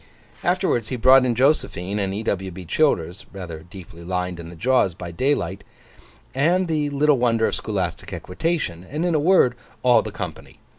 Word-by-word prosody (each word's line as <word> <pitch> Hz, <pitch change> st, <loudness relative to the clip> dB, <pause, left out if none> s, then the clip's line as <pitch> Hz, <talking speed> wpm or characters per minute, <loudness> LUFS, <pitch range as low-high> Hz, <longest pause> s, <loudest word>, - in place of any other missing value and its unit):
Afterwards 175 Hz, -, +1 dB
he 130 Hz, -, -3 dB
brought 130 Hz, +2 st, +6 dB
in 120 Hz, -2 st, +1 dB
Josephine, 105 Hz, -, +1 dB
and 95 Hz, -1 st, -1 dB
E. 105 Hz, +3 st, -4 dB
W. 95 Hz, -3 st, -2 dB
B. 90 Hz, 0 st, -9 dB
Childers 95 Hz, -, 0 dB
(rather 90 Hz, -5 st, -7 dB
deeply 85 Hz, 0 st, -12 dB
lined 90 Hz, 0 st, -3 dB
in 85 Hz, 0 st, -8 dB
the 85 Hz, -, -10 dB
jaws 110 Hz, -2 st, +2 dB
by 85 Hz, -1 st, -7 dB
daylight), 100 Hz, -3 st, -1 dB, 0.7 s
and 175 Hz, +7 st, +2 dB
the 150 Hz, -3 st, 0 dB
Little 145 Hz, -1 st, +3 dB
Wonder 115 Hz, -2 st, +2 dB
of -, -, 0 dB
Scholastic 95 Hz, -6 st, -3 dB
Equitation, 90 Hz, -, -3 dB
and 150 Hz, -, -3 dB
in 175 Hz, -, +1 dB
a 155 Hz, -, +3 dB
word, 155 Hz, -6 st, +4 dB, 0.3 s
all 125 Hz, -1 st, +5 dB
the -, -, -6 dB
company. -, -, -7 dB
110 Hz, 180 wpm, -23 LUFS, 90-145 Hz, 0.7 s, brought